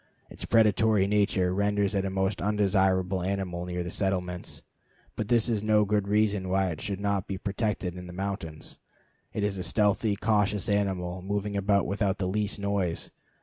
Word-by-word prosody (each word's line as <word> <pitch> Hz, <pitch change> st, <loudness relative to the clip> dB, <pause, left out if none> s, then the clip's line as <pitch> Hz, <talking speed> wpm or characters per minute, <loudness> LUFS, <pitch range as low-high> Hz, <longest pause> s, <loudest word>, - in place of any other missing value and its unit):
Its -, -, -5 dB
predatory 110 Hz, -2 st, +4 dB
nature 100 Hz, -3 st, +2 dB
renders 100 Hz, 0 st, +1 dB
it 100 Hz, -1 st, 0 dB
a -, -, -1 dB
most 95 Hz, +1 st, -1 dB
undesirable 95 Hz, -2 st, +2 dB
animal 90 Hz, -2 st, -2 dB
near 90 Hz, 0 st, -3 dB
settlements, 90 Hz, -1 st, -2 dB, 0.5 s
but 110 Hz, -, -3 dB
this 115 Hz, 0 st, +3 dB
is 110 Hz, -4 st, 0 dB
no 105 Hz, 0 st, +3 dB
good 105 Hz, -1 st, 0 dB
reason 105 Hz, -2 st, +1 dB
why 95 Hz, 0 st, +1 dB
it 80 Hz, -, -6 dB
should 100 Hz, -3 st, -3 dB
not 100 Hz, -2 st, -1 dB
be 95 Hz, -, -3 dB
protected 100 Hz, -2 st, -2 dB
in 90 Hz, 0 st, -8 dB
the -, -, -8 dB
mountains. 90 Hz, -4 st, -5 dB, 0.5 s
It 105 Hz, -, -2 dB
is 100 Hz, -2 st, -1 dB
a -, -, -2 dB
stealthy, 105 Hz, +1 st, +2 dB
cautious 105 Hz, -1 st, +1 dB
animal, 95 Hz, -3 st, -1 dB
moving 100 Hz, +2 st, -2 dB
about 100 Hz, 0 st, +2 dB
without 100 Hz, 0 st, 0 dB
the 95 Hz, -, -2 dB
least 105 Hz, +2 st, -1 dB
noise. 100 Hz, -4 st, -1 dB
100 Hz, 170 wpm, -28 LUFS, 95-105 Hz, 0.5 s, predatory